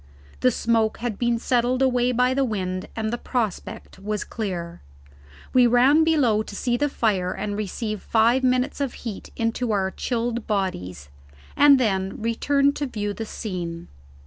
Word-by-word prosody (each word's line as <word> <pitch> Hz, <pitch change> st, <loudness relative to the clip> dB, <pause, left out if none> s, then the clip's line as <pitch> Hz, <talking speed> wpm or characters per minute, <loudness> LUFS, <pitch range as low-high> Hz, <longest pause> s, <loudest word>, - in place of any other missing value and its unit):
The 255 Hz, -, +4 dB
smoke 225 Hz, -2 st, +1 dB
had 235 Hz, -4 st, -4 dB
been 240 Hz, -1 st, +1 dB
settled 250 Hz, +2 st, +1 dB
away 250 Hz, -1 st, +2 dB
by 250 Hz, +1 st, +2 dB
the 275 Hz, +1 st, +1 dB
wind, 185 Hz, -6 st, -3 dB
and 220 Hz, 0 st, -2 dB
the 240 Hz, -, -2 dB
prospect 220 Hz, -6 st, -4 dB
was 210 Hz, +1 st, -3 dB
clear. 175 Hz, -6 st, -5 dB, 0.7 s
We 250 Hz, -1 st, +6 dB
ran 260 Hz, +6 st, +5 dB
below 275 Hz, -10 st, +3 dB
to 215 Hz, -, -8 dB
see 240 Hz, +3 st, 0 dB
to 290 Hz, +4 st, +1 dB
the -, -, -5 dB
fire 190 Hz, -8 st, 0 dB
and 205 Hz, -1 st, -4 dB
receive 215 Hz, 0 st, -3 dB
five 235 Hz, +4 st, +3 dB
minutes 255 Hz, +3 st, +1 dB
of 275 Hz, -3 st, -2 dB
heat 215 Hz, -4 st, -6 dB
into 230 Hz, +1 st, -1 dB
our 190 Hz, -2 st, 0 dB
chilled 235 Hz, 0 st, -2 dB
bodies, 90 Hz, -, -3 dB, 0.5 s
and 285 Hz, -1 st, +7 dB
then 195 Hz, -5 st, 0 dB
returned 275 Hz, +5 st, +1 dB
to 290 Hz, -, -2 dB
view 205 Hz, -4 st, -3 dB
the 225 Hz, +1 st, -6 dB
scene. 175 Hz, -6 st, -5 dB
230 Hz, 165 wpm, -24 LUFS, 205-250 Hz, 0.7 s, and